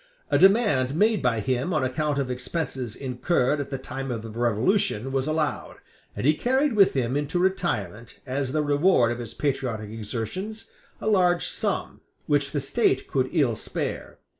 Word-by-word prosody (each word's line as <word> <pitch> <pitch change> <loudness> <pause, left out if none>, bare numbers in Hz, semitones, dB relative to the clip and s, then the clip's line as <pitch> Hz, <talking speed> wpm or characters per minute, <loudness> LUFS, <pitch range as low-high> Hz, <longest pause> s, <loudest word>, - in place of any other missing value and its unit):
A - - +4
demand 190 - +4
made 215 +4 +3
by 115 -4 +1
him 130 - -1
on 150 - +1
account 145 +3 -1
of 135 -2 -1
expenses 125 -2 -4
incurred 130 +2 0
at 140 - -4
the 135 - -3
time 135 +1 -6
of 115 -3 -3
the 115 - -7
Revolution 120 - +1
was 135 +1 -1
allowed; 155 -1 -2 0.4
and 100 - -3
he 150 - +5
carried 265 - +1
with 200 -3 +5
him 125 -1 0
into 145 +4 -1
retirement 175 - -1
as 135 0 -2
the 155 +1 +1
reward 145 -4 +3
of 120 - -4
his 115 -2 -7
patriotic 125 -7 -2
exertions 115 - -5 0.3
a - - -8
large 180 -5 +3
sum, - - -3 0.2
which 145 -2 +1
the 145 - -1
State 135 - +1
could 130 -1 0
ill 140 -9 +2
spare. - - -4
135 Hz, 170 wpm, -25 LUFS, 125-175 Hz, 0.4 s, he